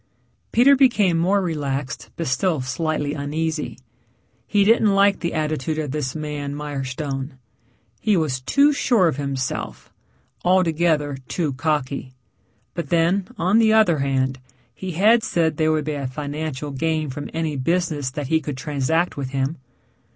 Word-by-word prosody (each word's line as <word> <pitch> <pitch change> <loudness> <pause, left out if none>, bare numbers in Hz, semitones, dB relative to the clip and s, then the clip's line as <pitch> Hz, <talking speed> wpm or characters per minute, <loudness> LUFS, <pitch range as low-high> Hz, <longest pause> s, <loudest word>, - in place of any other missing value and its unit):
Peter 270 +4 +6
became 215 -10 +4
more 190 +4 +2
relaxed 140 -5 -3
but 165 - -3
still 155 +5 +1
slightly 145 +3 -2
uneasy. 155 +2 -3 0.7
He 205 -1 +3
didn't 215 -1 +4
like 200 0 +4
the 170 - -3
attitude 155 0 -1
of 150 -3 -2
this 145 -2 -3
man, 150 -2 -4
Mirestone. 135 -1 -4 0.6
He 210 -3 +2
was 140 -6 -1
too 280 - +4
sure 235 -9 +3
of 155 - -1
himself 135 -2 -4 0.5
altogether 165 -5 +2
too 155 -6 -1
cocky. 140 -2 -2 0.6
But 170 -5 -5
then 175 +3 +2
on 185 +6 +3
the 220 -1 +4
other 215 -8 +4
hand 135 -1 0 0.3
he 185 -2 -6
had 215 +7 +5
said 160 -7 0
there 155 -1 +2
would 155 -2 0
be 155 - -2
a 140 -2 -3
financial 145 +1 -4
gain 155 +1 -1
from 145 +2 -6
any 160 -2 -2
business 155 -1 0
that 145 +2 -5
he 160 0 +2
could 145 -4 -5
transact 150 +5 0
with 135 -2 -3
him. 135 +3 -2
155 Hz, 150 wpm, -22 LUFS, 140-175 Hz, 0.7 s, Peter